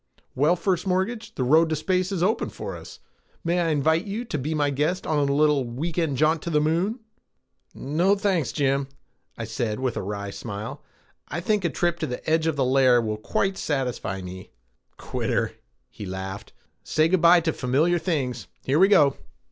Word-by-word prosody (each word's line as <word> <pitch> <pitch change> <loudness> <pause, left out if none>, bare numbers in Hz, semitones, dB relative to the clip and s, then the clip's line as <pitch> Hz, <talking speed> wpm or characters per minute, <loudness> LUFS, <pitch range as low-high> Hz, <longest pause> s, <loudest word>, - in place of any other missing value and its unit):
Well, 150 +7 +3
First 180 +1 -1
Mortgage, 195 +5 -1
the 130 - -1
road 160 +6 +4
to 160 - 0
space 185 +4 0
is 180 -3 -1
open 215 +4 +1
for - - -6
us. - - -11 0.4
May 170 +1 +1
I 170 - +1
invite 160 +4 +2
you 215 +4 -4
to 155 -10 -3
be 155 +4 -2
my 145 -1 +1
guest 150 +7 -1
on 145 -2 +1
a - - +2
little 150 -1 +3
week 150 +8 -3
end 155 -6 0
jaunt 155 +3 +2
to 170 - -4
the 150 -2 +2
Moon?" 175 +10 0 0.7
"No 170 +8 +1
thanks, 190 - 0
Jim," 140 -1 0 0.5
I 115 - -4
said 110 0 -3
with 130 -2 -1
a - - -2
wry 100 0 -4
smile. 105 0 -6 0.5
"I - - -4
think 205 +3 0
a - - +2
little - - -7
trip 175 -1 +1
to - - -2
the 125 - -6
edge 160 0 +2
of 160 - +1
the 135 -2 +1
layer 130 -1 +5
will 110 -2 -2
quite 190 - -1
satisfy 125 -9 -2
me." 90 +1 -9 0.5
"Quitter," - - -1 0.4
he 105 - -8
laughed. 95 +1 -6
"Well, - - -36 0.2
say 155 +1 +2
good 180 0 +2
by 170 +1 +7
to 160 -1 0
familiar 150 +7 +1
things. 135 -9 -2 0.2
Here 140 +4 +1
we 190 - +7
go!" 145 -9 +4
155 Hz, 200 wpm, -25 LUFS, 130-175 Hz, 0.7 s, by